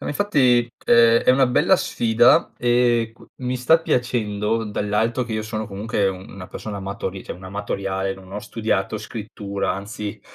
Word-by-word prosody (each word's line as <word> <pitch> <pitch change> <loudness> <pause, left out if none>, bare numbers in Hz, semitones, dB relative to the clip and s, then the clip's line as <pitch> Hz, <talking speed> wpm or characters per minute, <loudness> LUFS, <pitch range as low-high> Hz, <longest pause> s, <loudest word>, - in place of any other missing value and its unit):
No, - - -7
ma - - -2
infatti 130 - +2
è 115 0 +5
è - - +8
una 130 +1 +4
bella 145 +9 +3
sfida 115 -3 +3
e 120 -2 +2
q - - -17
mi 125 0 -2
sta 145 +7 +4
piacendo, 115 -6 0
dall'alto 105 +4 -1
che 120 - -6
io 110 0 -1
sono 110 0 -4
comunque 100 0 -1
una 95 0 -8
persona 100 +1 -7
amatori 95 -1 -5
cioè, - - -5
un 90 - -12
amatoriale, 95 0 -3
non 95 -1 -14
ho 105 - -3
studiato 110 -1 -2
scrittura, 105 -2 -4
anzi 105 +1 -6
110 Hz, 170 wpm, -22 LUFS, 100-120 Hz, -, è